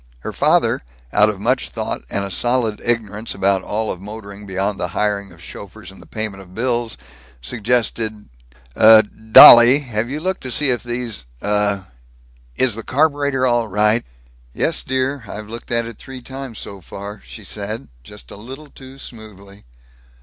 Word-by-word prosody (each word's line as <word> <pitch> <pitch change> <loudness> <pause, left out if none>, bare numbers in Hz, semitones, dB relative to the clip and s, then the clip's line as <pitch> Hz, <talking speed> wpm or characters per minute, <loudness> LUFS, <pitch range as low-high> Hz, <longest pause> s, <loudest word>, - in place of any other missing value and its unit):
Her - - -6
father, - - +2 0.3
out 105 +1 +5
of 105 -2 -4
much 125 +5 0
thought - - -4
and 100 - -1
a 100 - -6
solid 120 +1 0
ignorance 115 -2 -2
about 95 0 +2
all 110 +3 -2
of 90 - -7
motoring 100 0 -10
beyond 95 +1 -2
the 90 - -1
hiring 100 -2 -1
of 85 -1 -16
chauffeurs 100 +3 -10
and 95 - -15
the - - -16
payment 110 -3 -5
of 95 -1 -16
bills, 120 -1 -1 0.4
suggested, 110 - -2 0.5
"Uh, 110 0 +8 0.3
dolly, 120 +4 +11
have 120 -3 -3
you 145 +3 -4
looked 185 +3 -2
to 130 - -6
see 135 +2 +2
if 120 - -1
these, 120 - -5 0.2
uh 105 -1 +1 0.7
Is 130 -3 +2
the 115 - -5
carburetor 140 0 +1
all 120 -2 +1
right?" 105 +3 +2 0.5
"Yes, - - 0
dear; 130 0 -1
I've 105 +1 -8
looked 115 +1 -8
at 115 -1 +1
it 115 -2 -9
three 130 -2 -10
times, 135 -3 -7
so 100 -1 -8
far," 100 +4 -9
she 110 - -11
said, 105 +3 -5 0.2
just - - -14
a - - -9
little 135 +7 -10
too 130 0 -13
smoothly. 105 -5 -12
110 Hz, 170 wpm, -19 LUFS, 100-125 Hz, 0.7 s, dolly